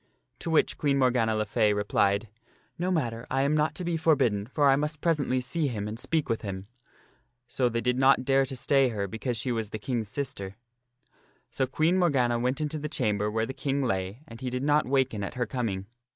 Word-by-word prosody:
To - - -9
the - - 0
which 155 - +2
Queen 140 -2 +2
Morgana 125 -4 +2
le 110 0 0
Fay 105 0 +2
replied, 105 +1 +1 0.3
" - - -36
No 180 +1 0
matter, 120 -9 -1
I 135 +1 +1
am 140 +2 +2
not 155 +1 +1
to 180 - -4
be 170 -1 0
forbidden, 130 -11 +2
for 145 +2 +2
I 135 - +6
must 150 +2 -2
presently 150 -6 +1
see 155 +4 -1
him 105 -5 -3
and 110 +2 -6
speak 155 +3 -1
with 115 - -1
him." 95 -2 -5 0.8
So 125 -1 +1
they 115 0 -1
did 125 +1 0
not 130 -1 +4
dare 135 0 +3
to 130 - -5
stay 135 0 +3
her 100 -4 -2
because 115 +4 -3
she 125 +3 -1
was 110 -3 -2
the 110 - -5
King's 115 0 -2
sister. 100 -7 -4 1.0
So 130 - 0
Queen 160 +7 +2
Morgana 130 -9 +2
went 125 +3 0
into 155 0 -2
the 150 +1 -4
chamber 105 -9 0
where 110 +1 0
the 130 - -6
King 140 +1 -1
lay 95 +2 -2
and 115 0 -11
he 130 - -2
did 125 +1 -3
not 150 0 +3
waken 130 -6 +1
at 100 - -5
her 125 -1 0
coming. 110 -5 -3
125 Hz, 225 wpm, -28 LUFS, 110-140 Hz, 1.0 s, I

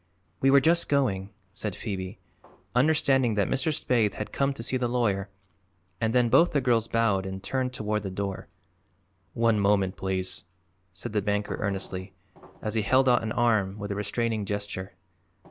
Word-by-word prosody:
"We 135 - +3
were 140 0 +6
just 170 +4 +3
going," 105 -9 +1 0.2
said 105 -1 -3
Phoebe, 95 -3 -5 0.6
understanding 135 -3 +3
that 100 -2 +2
Mr. 135 +3 -1
Spaythe 120 -8 +1
had 105 - -5
come 140 0 +1
to 115 - -6
see 130 - -1
the 125 -1 0
lawyer, 105 -5 0 0.7
and 110 0 +1
then 125 0 +3
both 165 +9 +4
the 145 - +3
girls 120 -4 +2
bowed 115 -5 +1
and 95 0 -6
turned 130 -1 -1
toward 105 -3 -2
the 100 - -4
door. 95 0 -4 0.9
"One 115 -2 +3
moment, 100 -1 +2
please," 95 -1 -3 0.5
said 100 +3 -7
the 105 - +1
banker 105 +1 -1
earnestly, 95 -1 -3 0.5
as 105 - -2
he 110 - +1
held 130 +6 +3
out 120 -2 +4
an 110 -1 -3
arm 110 -5 +1
with 100 0 -5
a - - -2
restraining 105 +1 -1
gesture. 100 -2 -4
105 Hz, 170 wpm, -27 LUFS, 100-125 Hz, 0.9 s, were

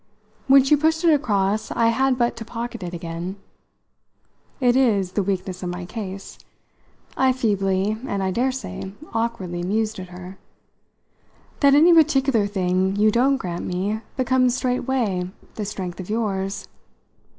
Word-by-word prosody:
When 270 0 +7
she 275 +3 +4
pushed 320 +3 +1
it 330 -2 +6
across 215 -6 0
I 230 -1 +2
had 260 +2 +2
but 240 -1 +1
to 230 - -5
pocket 230 0 -6
it 175 -1 -5
again. 170 +2 -5 1.2
"It 245 -2 +3
is 210 -8 +2
the 205 - 0
weakness 185 -1 -3
of 180 - -3
my 180 0 -5
case," 195 -1 -7 0.8
I 260 0 +3
feebly 200 -4 0
and 200 -1 -2
I 190 - 0
daresay 255 -4 -3 0.2
awkwardly 225 -7 -2
mused 215 +3 -1
at 185 - -7
her, 180 +1 -10 1.2
"that 280 -1 +5
any 330 +4 +7
particular 270 -9 +3
thing 190 -1 0
you 215 +1 +4
don't 265 +5 +3
grant 175 -7 -5
me 200 +5 -2 0.2
becomes 255 -1 +2
straightway 245 -8 -1 0.2
the 210 - -4
strength 190 -3 -5
of 185 - -7
yours. 200 -3 -2
215 Hz, 145 wpm, -23 LUFS, 190-255 Hz, 1.2 s, When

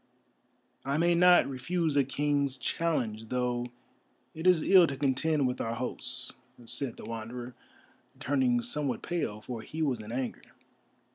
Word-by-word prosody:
"I 140 +2 -1
may 170 +2 +3
not 180 +1 +6
refuse 150 +4 -1
a 140 - +5
King's 140 0 0
challenge, 120 -7 -1
though 125 -1 -1 0.7
it 160 +3 -2
is 175 -4 +5
ill 185 -3 +7
to 135 - -4
contend 145 +2 +1
with 125 - -2
our 115 0 -2
hosts," 125 +1 -3 0.3
said 125 +1 -4
the - - -9
Wanderer, 120 +2 -6 0.7
turning 130 -3 +2
somewhat 125 +1 -2
pale, 135 -12 -2
for 115 0 -6
he 160 +7 -4
was 130 -6 0
in 105 +1 -8
anger. 125 0 -3
130 Hz, 145 wpm, -30 LUFS, 120-155 Hz, 0.7 s, ill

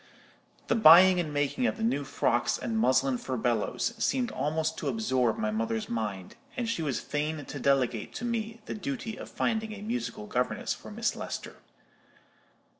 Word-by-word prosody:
The - - +1
buying 185 -3 +8
and 160 -4 -2
making 145 - 0
of - - -1
the 225 - -4
new 225 -11 +1
frocks 120 -3 +1
and 230 - -3
muslin 130 - +2
furbelows 120 - -1
seemed 255 -2 +1
almost 160 +1 -1
to - - -3
absorb 130 - +1
my 110 - -1
mother's 110 0 -2
mind, 105 -5 -4 0.2
and 240 -2 -1
she 230 -7 -1
was 145 -5 -1
fain 150 0 -3
to - - -7
delegate 125 -5 +1
to 240 - -4
me 230 -1 -3
the - - -4
duty 210 +3 -4
of - - -9
finding 220 -2 -1
a 205 -1 -8
musical 225 - -3
governess 125 +4 -1
for - - -11
Miss - - -1
Lester. - - -6
150 Hz, 170 wpm, -29 LUFS, -, 0.2 s, buying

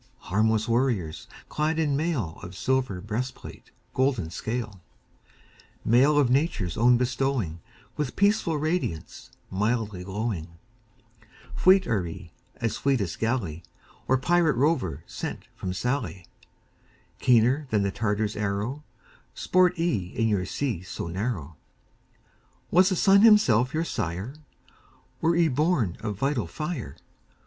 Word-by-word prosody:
Harmless 110 +2 +2
warriors, 115 -10 0 0.2
clad 155 +1 -1
in 150 -3 +1
mail 140 - -2
Of 90 +1 -9
silver 130 -8 0
breastplate, 115 +6 -6 0.2
golden 125 - 0
scale; 110 -2 -4 1.0
Mail 135 +6 +4
of 145 -3 +4
Nature's 125 - 0
own 120 +2 +5
bestowing, 125 -8 -1 0.4
With 150 -4 -2
peaceful 200 -6 +2
radiance, 155 - -3 0.2
mildly 105 -1 -1
glowing 95 -4 -4 1.0
Fleet 190 0 +5
are 95 -6 0
ye 80 - -9 0.2
as 115 -3 -2
fleetest 120 -11 0
galley 110 -9 -1 0.5
Or 130 - +3
pirate 165 +2 +2
rover 125 - 0
sent - - -6
from 95 - -4
Sallee; 110 -3 -2 0.9
Keener 125 +4 +3
than 105 -3 +1
the 100 - 0
Tartar's 105 0 -1
arrow, 105 +8 -2 0.5
Sport 180 0 +3
ye 165 - 0
in 115 - +1
your 100 -4 0
sea 125 -10 -2
so 90 -2 -6
narrow. 85 - -4 1.1
Was 185 +2 +5
the 190 - 0
sun 195 +2 +5
himself 135 - +5
your 160 +2 -1
sire? 90 - -3 0.9
Were 165 +1 +3
ye 170 -1 +4
born 140 - +1
of 105 -1 -4
vital 135 - 0
fire? 145 - -5
120 Hz, 120 wpm, -26 LUFS, 100-150 Hz, 1.1 s, own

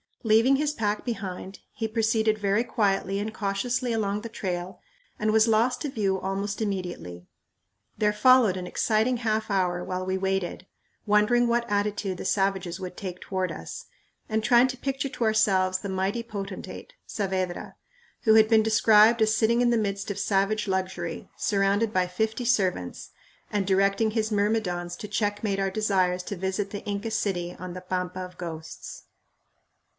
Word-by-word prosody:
Leaving 225 +4 +5
his 300 +1 0
pack 210 -4 -1
behind, 195 -5 -5
he 225 - -2
proceeded 220 -1 +1
very 205 +2 +1
quietly 195 -4 0
and 215 +2 -3
cautiously 230 +5 -1
along 205 -2 -1
the 230 - -7
trail 185 -4 -4 0.4
and 215 0 +1
was 220 +1 +4
lost 230 +3 +2
to 295 - -2
view 195 -6 0
almost 200 +3 -3
immediately. 175 - -4 0.7
There 210 -1 +2
followed 235 -2 +5
an 180 -1 -5
exciting 220 +6 +1
half 220 -2 -1
hour 180 -3 0
while 185 0 -3
we 190 0 -1
waited, 190 -1 -2 0.4
wondering 210 +4 +4
what 235 0 0
attitude 205 -2 -1
the - - -7
savages 195 -3 0
would 180 -1 -7
take 180 -2 -6
toward 185 -1 -2
us, - - -8 0.4
and 220 0 0
trying 240 +2 +5
to 255 - -5
picture 270 +1 -2
to 250 -2 -4
ourselves 195 -4 +2
the 200 - -6
mighty 190 +4 -1
potentate, 215 - -7
Saavedra, 185 -3 -3 0.5
who 220 -1 +5
had 220 -1 +7
been 220 -1 +5
described 220 +1 +5
as 220 0 +2
sitting 230 +2 +3
in 240 -1 +3
the 235 - +3
midst 200 -2 -2
of 200 - -5
savage 205 +1 +1
luxury, 185 -3 -3
"surrounded 200 +2 +1
by 185 -1 +2
fifty 220 +6 -2
servants," 185 - 0 0.4
and 205 -2 0
directing 195 +3 +2
his 220 0 -1
myrmidons 200 -5 0
to 210 - -7
checkmate 205 -1 -1
our 195 0 0
desires 190 -3 +1
to 200 - -5
visit 190 +2 -2
the 205 - -6
Inca 205 +2 -3
city 180 -5 -2
on 185 -1 -6
the 185 - -7
"pampa 180 0 -3
of 180 -1 -7
ghosts." 160 -2 -8
205 Hz, 165 wpm, -26 LUFS, 190-220 Hz, 0.7 s, had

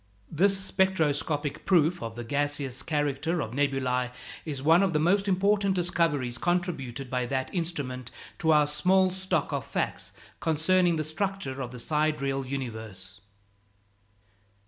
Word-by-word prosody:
This 195 +5 +4
spectroscopic 160 -6 0
proof 175 -2 +3
of 115 -1 -5
the 120 - -5
gaseous 140 0 -1
character 150 +3 -1
of 110 -7 -3
nebulæ 130 -2 0 0.3
is 145 -4 -4
one 165 +4 +6
of 195 -3 +1
the 150 - +2
most 195 +5 +2
important 200 +1 +2
discoveries 155 -9 +1
contributed 160 -8 -1
by 125 -1 -1
that 130 0 -2
instrument 145 -8 -3 0.3
to 160 - 0
our 150 -1 +5
small 185 +6 +3
stock 185 -5 -1
of 140 -3 -1
facts - - -3 0.3
concerning 170 +2 +2
the 155 - -1
structure 155 -4 -3
of 125 - -4
the 125 - -9
sidereal 140 -1 0
universe. 110 -7 -6
150 Hz, 135 wpm, -28 LUFS, 135-180 Hz, 0.3 s, one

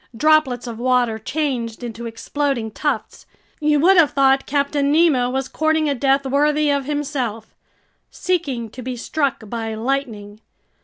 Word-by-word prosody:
Droplets 300 -4 +3
of 230 -2 -7
water 245 -3 +1
changed 245 -3 -3
into 235 0 -6
exploding 235 0 -2
tufts. 295 +7 -3 0.3
You 300 -1 +2
would 380 +4 +5
have 320 -4 +6
thought 270 -1 +3
Captain 280 0 0
Nemo 300 -6 +3
was 265 +1 -2
courting 315 0 0
a 285 - +1
death 275 +1 +1
worthy 295 +2 +2
of 280 -1 0
himself, 270 -7 -3 0.6
seeking 275 - -2
to 255 - -9
be 255 0 -4
struck 275 -2 -2
by 225 0 -4
lightning. 220 -4 -3
270 Hz, 145 wpm, -20 LUFS, 235-295 Hz, 0.6 s, have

